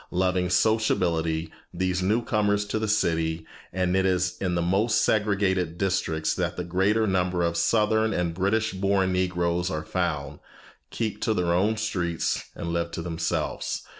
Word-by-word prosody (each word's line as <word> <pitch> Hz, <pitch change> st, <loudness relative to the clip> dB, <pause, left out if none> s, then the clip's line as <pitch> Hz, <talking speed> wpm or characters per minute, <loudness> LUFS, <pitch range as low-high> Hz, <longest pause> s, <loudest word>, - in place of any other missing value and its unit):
Loving 90 Hz, 0 st, 0 dB
sociability, 85 Hz, -6 st, +1 dB, 0.2 s
these 90 Hz, +1 st, -1 dB
new 105 Hz, +6 st, +1 dB
comers 105 Hz, -1 st, +1 dB
to 105 Hz, +1 st, -2 dB
the 110 Hz, -, -1 dB
city 80 Hz, -6 st, 0 dB, 0.3 s
and 90 Hz, 0 st, 0 dB
it 95 Hz, -, +3 dB
is 90 Hz, -1 st, +1 dB
in 90 Hz, -2 st, 0 dB
the 85 Hz, -, +1 dB
most 100 Hz, +6 st, +2 dB
segregated 100 Hz, -5 st, +1 dB
districts 80 Hz, -5 st, 0 dB
that 90 Hz, -2 st, -2 dB
the 90 Hz, -, -2 dB
greater 95 Hz, +6 st, +1 dB
number 90 Hz, -3 st, 0 dB
of 85 Hz, 0 st, 0 dB
southern 110 Hz, +5 st, +2 dB
and 90 Hz, -4 st, -1 dB
British 105 Hz, +5 st, 0 dB
born 95 Hz, 0 st, +1 dB
Negroes 90 Hz, -1 st, 0 dB
are 80 Hz, -4 st, -4 dB
found 75 Hz, -5 st, -2 dB, 0.5 s
keep 110 Hz, -2 st, -3 dB
to 110 Hz, -, +1 dB
their 85 Hz, -2 st, +1 dB
own 105 Hz, +5 st, +2 dB
streets 90 Hz, -6 st, -1 dB
and 85 Hz, 0 st, -4 dB
live 85 Hz, 0 st, -1 dB
to 85 Hz, -, -4 dB
themselves. 85 Hz, -1 st, -2 dB
90 Hz, 160 wpm, -26 LUFS, 85-105 Hz, 0.5 s, it